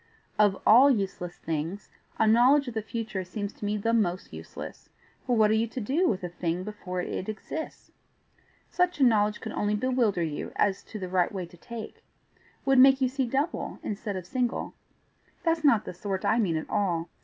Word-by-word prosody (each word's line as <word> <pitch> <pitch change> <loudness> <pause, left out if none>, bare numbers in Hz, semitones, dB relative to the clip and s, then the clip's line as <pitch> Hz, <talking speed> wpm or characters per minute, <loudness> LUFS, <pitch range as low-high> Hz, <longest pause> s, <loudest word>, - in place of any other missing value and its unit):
Of 205 -2 +4
all 255 +6 +8
useless 195 -7 -2
things 165 +5 -4 0.3
a - - +3
knowledge 250 +6 +5
of 245 - -4
the 220 - -2
future 215 -3 -4
seems 205 +3 -5
to - - -7
me 210 +1 0
the 225 +3 0
most 185 -5 0
useless, - - -9 0.4
for 245 - +2
what 215 -1 +5
are - - +4
you 220 +1 +2
to 235 - -6
do 280 - +1
with 190 -3 -2
a 180 - -3
thing 175 0 -2
before 185 -3 -5
it 185 +2 -4
exists? 310 +8 -6 0.8
Such 360 -2 +1
a - - +4
knowledge 210 -3 +3
could 220 - -5
only 205 0 0
bewilder 225 -6 +1
you 155 -3 -4
as 195 -1 +1
to 220 - -8
the 185 -3 -5
right 180 -1 +1
way 190 -3 -4
to 170 - -16
take 225 +5 -9 0.6
would 270 -1 +4
make 270 +1 +7
you 260 -1 +2
see 265 -1 -1
double 280 +7 -2
instead 205 -1 -4
of 185 -2 -5
single. 250 +3 -2 0.7
That's 330 -2 +1
not 235 -8 +4
the - - -6
sort 190 +1 -4
I 225 - +3
mean 175 -8 +1
at 155 - -5
all. 175 -5 0
210 Hz, 200 wpm, -27 LUFS, 185-245 Hz, 0.8 s, all